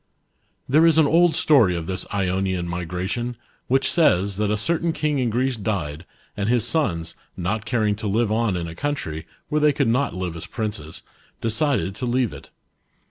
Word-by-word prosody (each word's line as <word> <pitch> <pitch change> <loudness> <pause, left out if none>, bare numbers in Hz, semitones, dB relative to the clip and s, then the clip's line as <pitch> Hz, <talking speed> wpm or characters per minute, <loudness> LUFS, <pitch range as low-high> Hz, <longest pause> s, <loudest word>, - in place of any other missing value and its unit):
There 155 +5 +5
is 160 -1 +4
an 160 - +6
old 165 +2 +4
story 115 - +4
of 85 -1 -4
this 95 +2 -3
Ionian 95 -2 -1
migration, 90 +8 -3 0.3
which 135 +2 +2
says, 100 - +3
tjiat 105 +1 0
a 105 - +1
certain 165 +9 0
king 150 -3 0
in 125 -2 +1
Greece 125 +2 0
died, 85 -7 -3 0.3
and 100 +1 -1
his 120 -2 +2
sons, 85 - 0 0.2
riot 100 +5 -2
caring 110 -4 +1
to 110 -1 -4
live 110 +2 +1
on 110 -4 +1
in 85 -1 -3
a 80 - -7
country, 85 - -4 0.2
where 150 0 +1
they 150 0 +5
could 140 -3 +1
not 125 +2 +1
live 90 -2 -3
as 85 +1 -7
princes, 100 -8 -5 0.4
decided 115 - 0
to 125 - -3
kave 125 -2 +1
it. - - -11
110 Hz, 185 wpm, -23 LUFS, 90-135 Hz, 0.4 s, an